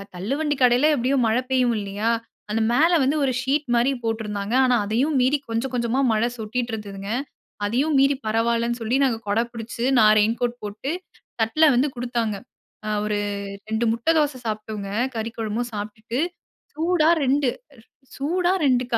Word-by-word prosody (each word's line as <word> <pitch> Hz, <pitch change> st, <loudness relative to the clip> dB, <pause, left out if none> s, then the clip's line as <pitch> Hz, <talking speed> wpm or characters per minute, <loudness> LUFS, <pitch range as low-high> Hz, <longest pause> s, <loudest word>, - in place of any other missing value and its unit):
தள்ளுவண்டி 280 Hz, -, -1 dB
கடையில 250 Hz, +5 st, +5 dB
எப்படியோ 260 Hz, +2 st, +1 dB
மழை 230 Hz, +3 st, +2 dB
பெய்யும் 250 Hz, -3 st, +2 dB
இல்லையா? 205 Hz, +3 st, -2 dB, 0.4 s
அந்த 225 Hz, +1 st, 0 dB
மேல 320 Hz, +7 st, +4 dB
வந்து 280 Hz, +4 st, +2 dB
ஒரு 265 Hz, -, +2 dB
ஷீட் 280 Hz, +3 st, 0 dB
மாரி 245 Hz, +4 st, +3 dB
போட்டிருந்தாங்க. 215 Hz, -1 st, -3 dB
ஆனா 250 Hz, -1 st, +3 dB
அதையும் 260 Hz, +8 st, 0 dB
மீறி 265 Hz, +4 st, +3 dB
கொஞ்சம் 230 Hz, +3 st, -2 dB
கொஞ்சமா 240 Hz, +2 st, 0 dB
மழை 220 Hz, +2 st, +2 dB
சொட்டிட்டு 235 Hz, +2 st, -3 dB
இருந்ததுங்க. 200 Hz, -2 st, -6 dB, 0.6 s
அதையும் 275 Hz, +8 st, +1 dB
மீறி 275 Hz, +1 st, +4 dB
பரவாயில்லனு 235 Hz, +2 st, 0 dB
சொல்லி 225 Hz, +3 st, 0 dB
நாங்க 245 Hz, -4 st, +1 dB
குடை 220 Hz, +3 st, +2 dB
பிடிச்சு, 230 Hz, +1 st, -6 dB, 0.2 s
நான் 215 Hz, 0 st, +7 dB
ரெயின் 220 Hz, +2 st, +2 dB
கோட் 245 Hz, 0 st, -1 dB
போட்டு, 210 Hz, +8 st, -4 dB, 0.5 s
தட்ல 310 Hz, +9 st, +3 dB
வந்து 265 Hz, +4 st, +3 dB
குடுத்தாங்க. 235 Hz, -3 st, -2 dB, 0.5 s
ஆ -, -, -2 dB, 0.2 s
ஒரு 210 Hz, -1 st, 0 dB, 0.5 s
2 220 Hz, +2 st, 0 dB
முட்டை 235 Hz, +8 st, +1 dB
தோசை 295 Hz, -3 st, +1 dB
சாப்பிட்டோங்க. 215 Hz, -2 st, -4 dB, 0.3 s
கறி 225 Hz, +1 st, -3 dB
குழம்பும் 225 Hz, +2 st, -2 dB
சாப்பிட்டுட்டு 215 Hz, +4 st, -5 dB, 0.5 s
சூடா 325 Hz, 0 st, +2 dB
2, 270 Hz, 0 st, +2 dB, 0.7 s
சூடா 350 Hz, +6 st, +1 dB
2 250 Hz, -1 st, +3 dB
235 Hz, 150 wpm, -23 LUFS, 220-270 Hz, 0.7 s, நான்